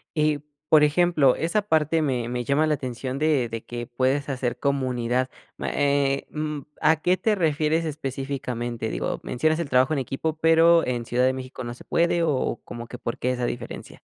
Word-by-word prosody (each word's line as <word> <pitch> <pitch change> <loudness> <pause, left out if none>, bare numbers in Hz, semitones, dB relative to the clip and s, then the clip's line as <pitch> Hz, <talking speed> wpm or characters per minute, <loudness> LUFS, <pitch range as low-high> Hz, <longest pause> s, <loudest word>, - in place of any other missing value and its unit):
Y, 150 -1 +2 0.3
por 155 -1 +7
ejemplo 150 -3 +4
esa 190 +6 +1
parte 160 -4 +1
me 125 -6 -1
me 125 0 -2
llama 145 +4 +2
la 155 - +2
atención 130 0 -5
de 150 -5 +2
de 115 0 -5
que 120 0 -6
puedes 130 +3 0
hacer 130 -3 -2
comunidad, 130 -2 0 0.3
ma - - -3
eh, 140 -1 +1
mm, 150 -1 -3 0.2
¿a 155 0 +3
qué 180 +3 +3
te 220 0 +1
refieres 160 -2 +1
específicamente? 130 -5 -4
Digo, - - -2
mencionas 155 +6 0
el 165 - -3
trabajo 130 +2 +3
en 140 - 0
equipo, 150 +5 -3
pero, 165 +1 +5
¿en 120 -2 -2
Ciudad 125 +2 +1
de 130 - +3
México 130 0 -7
no 120 - -5
se 120 - -14
puede? 170 0 +2
O, 150 -5 0
¿como 120 0 -7
que 125 - -8
por 115 -1 -4
qué, 125 - 0
esa 125 -1 -1
diferencia? 120 0 -6
140 Hz, 190 wpm, -25 LUFS, 125-155 Hz, 0.3 s, por